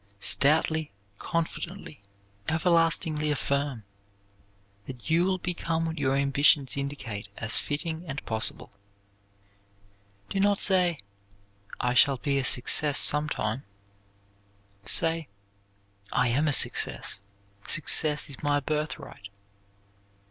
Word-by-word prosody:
Stoutly, 155 +6 +2 0.3
constantly, 170 - -5 0.5
everlastingly 160 -2 +1
affirm 140 -4 -2 1.0
that 130 +3 -8
you 170 +2 +3
will 190 0 0
become 170 -2 -2
what 160 -1 -5
your 135 -1 +1
ambitions 140 0 +2
indicate 140 -8 -5
as 110 0 +1
fitting 160 +3 -3
and 140 -1 -6
possible. 110 -1 -1 1.6
Do 195 - -3
not 200 0 +2
say, 180 -6 +3 0.8
"I 125 0 0
shall 135 +2 +4
be 140 +2 -1
a - - -2
success 140 +3 +3
sometime"; 140 -5 +2 1.2
say, 165 +6 +3 0.8
"I 125 0 +1
am 145 +6 0
a 145 - +3
success. 100 - +1 0.5
Success 150 -1 +3
is 140 - -9
my 145 0 +1
birthright." 150 -8 -5
150 Hz, 100 wpm, -26 LUFS, 135-165 Hz, 1.6 s, shall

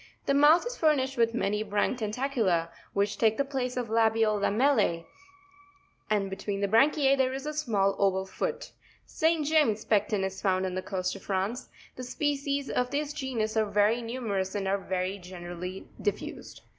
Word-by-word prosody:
The - - +2
mouth 295 +6 +6
is 485 +1 -4
furnished 270 -4 +2
with 230 -2 +2
many 210 -2 0
branched 210 +4 0
tentacula, 215 -7 0 0.2
which 200 0 0
take 220 -1 +3
the 280 - +1
place 255 -2 -3
of 245 -2 -2
labial 225 -1 +3
lamells, 205 -6 +2 1.0
and_ 205 -2 +1
be 195 - -5
tween 195 +1 -4
the 200 - +2
branchiz 275 +5 +4
there 260 -1 +1
is 270 +1 -5
a 300 - -3
small 215 -10 +1
oval 190 -1 +2
foot. 485 - -4 0.3
St. 320 -1 +1
James' 290 -9 +2
Pecten 210 -1 +1
is 190 0 -4
found 190 -1 +1
on 185 - -3
the 185 - -2
coast 185 -1 -3
of - - -9
France. 200 +5 -2 0.3
The 255 - -5
species 280 +1 -1
of 250 0 0
this 290 +2 -2
genus 250 -7 -2
are 215 -1 +1
very 210 +3 +2
nus 240 +2 -5
merous 195 -3 -2
and 195 -1 -2
are 200 +1 +1
very 190 +1 -3
generally 180 0 -7
dif: 205 -1 +1
fused. - - -9
220 Hz, 180 wpm, -28 LUFS, 195-270 Hz, 1.0 s, mouth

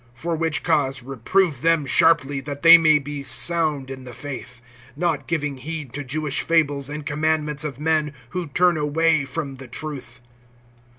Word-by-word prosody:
For 165 +6 -3
which 160 -1 -1
cause 135 -6 0
reprove 135 - 0
them 165 -2 +2
sharply, 145 -2 +2
that 145 +1 -7
they 165 0 +11
may 155 -2 +5
be 145 0 -6
sound 140 0 +1
in 130 -1 -8
the 125 -2 -10
faith; 125 -3 -8 0.4
(14)not 170 -4 -1
giving 150 -4 -2
heed 150 -1 -7
to 145 +1 -4
Jewish 145 +1 -1
fables, 145 -4 +1
and 150 0 -6
commandments 150 0 -1
of 145 -3 -5
men, 155 -1 0 0.2
who 175 +3 -4
turn 175 +3 +2
away 155 0 +1
from 135 0 -5
the 130 0 -11
truth. 125 -2 -7
150 Hz, 165 wpm, -22 LUFS, 135-160 Hz, 0.4 s, they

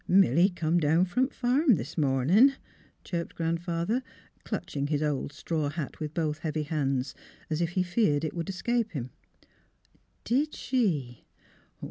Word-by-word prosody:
" - - -39 0.2
Milly 175 +5 +4
come 175 -2 0
down 160 +2 +3
f 180 -1 -1
om 255 +1 +4
th' - - -21
farm 260 +1 +3
this 155 - -6
momin','' 155 - +4 0.5
chirped 170 -2 -4
Grandfather, 170 +7 -1 0.4
clutching 140 -1 -3
his 150 0 0
old 145 -2 -1
straw 155 0 -2
hat 150 -1 -5
with 155 0 -5
both 155 -2 -1
heavy 155 -1 -2
hands, 140 -3 -1 0.4
as 155 +2 0
if 170 0 -1
he 185 - +2
feared 175 -5 +1
it 155 - -2
would 170 0 -4
escape 230 +3 -1
him. 130 -4 -4 1.1
''Did 280 +6 +1
she? 160 - -1
165 Hz, 155 wpm, -28 LUFS, 150-195 Hz, 1.1 s, Milly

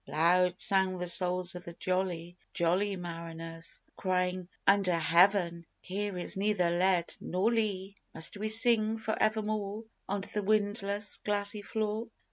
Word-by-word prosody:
Loud 180 +3 +3
sang 190 -2 +2
the 180 - -3
souls 180 0 +2
of 180 0 -8
the 170 - -8
jolly, 175 -1 -2 0.2
jolly 185 +4 +1
mariners, 165 -1 -7 0.2
Crying: 180 -1 -1 0.2
"Under 195 -3 +4
Heaven, 170 +1 +3 0.2
here 200 0 -4
is 175 - -2
neither 195 -3 +1
lead 180 0 +1
nor 190 +6 0
lea! 200 -4 -1 0.2
Must 160 - 0
we 215 +2 -2
sing 225 -1 +3
for 220 0 -2
evermore 215 -1 0 0.3
On 200 0 -1
the 210 +2 -3
windless, 205 0 0
glassy 205 0 -1
floor? 215 +2 -2
190 Hz, 135 wpm, -31 LUFS, 175-210 Hz, 0.3 s, Under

